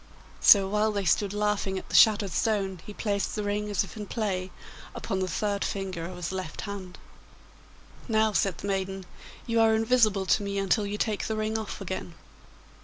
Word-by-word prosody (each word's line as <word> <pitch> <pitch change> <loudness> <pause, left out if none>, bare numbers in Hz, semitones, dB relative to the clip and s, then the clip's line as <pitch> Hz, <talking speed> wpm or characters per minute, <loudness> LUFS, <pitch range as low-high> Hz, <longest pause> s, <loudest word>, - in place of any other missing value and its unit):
So 195 -2 +7
while 210 +2 +1
they 200 -2 -2
stood 200 +2 +2
laughing 210 -2 -1
at - - -8
the - - -3
shattered 210 -3 +6
stone 195 -4 -1
he - - -6
placed 205 -1 -2
the 210 - -2
ring, 205 +1 -2
as 205 -1 +1
if 195 - -11
in 210 -2 -6
play, 190 -5 -2 0.5
upon 190 - -3
the 185 - -1
third 200 +2 -1
finger 190 -4 -3
of 180 - -8
his 175 0 -4
left 185 -4 -5
hand. 195 -3 -7 1.1
'Now,' 220 -2 +2
said 195 -4 +1
the - - -6
maiden, 195 -1 -2 0.4
'you 230 -1 +1
are 220 0 +5
invisible 220 -4 +3
to 200 - +3
me 200 0 -3
until 200 +2 +1
you 205 +1 -3
take 210 -1 -1
the 220 - -2
ring 215 0 -1
off 220 -2 -4
again. 185 -2 -5
200 Hz, 190 wpm, -27 LUFS, 190-215 Hz, 1.1 s, So